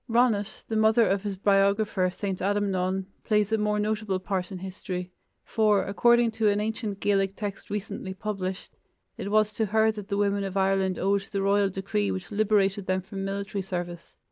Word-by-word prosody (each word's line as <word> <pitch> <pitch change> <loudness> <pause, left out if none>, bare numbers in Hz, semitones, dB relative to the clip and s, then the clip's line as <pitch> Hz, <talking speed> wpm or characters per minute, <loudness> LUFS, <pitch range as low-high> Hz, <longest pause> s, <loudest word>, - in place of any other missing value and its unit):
Ronnat, 225 -3 +1
the 220 - -3
mother 220 +1 +4
of 195 +1 +1
his 200 -2 -4
biographer, 200 -1 +2
St. 190 0 -4
Adamnan, 190 -1 0 0.2
plays 210 -1 +1
a 220 - +3
more 210 0 +1
notable 210 -2 -1
part 185 0 -3
in 190 - -5
history, 180 -1 -5 0.3
for, 215 -3 +2
according 235 +3 +4
to 220 -1 +2
an 205 0 +1
ancient 215 -1 -3
Gaelic 195 -1 +1
text 205 -2 -6
recently 200 -2 -4
published, 195 -2 -4 0.4
it 200 -4 -5
was 215 0 +3
to 220 0 0
her 220 +2 +3
that 210 -2 -8
the 200 -2 -1
women 200 0 +1
of 195 0 -3
Ireland 190 -1 +2
owed 200 +1 0
the 195 -1 -1
royal 200 0 +3
decree 190 - -1
which 95 0 -4
liberated 205 -2 +1
them 185 0 +1
from 195 +1 -6
military 200 0 -3
service. 175 -2 -6
200 Hz, 180 wpm, -27 LUFS, 190-210 Hz, 0.4 s, mother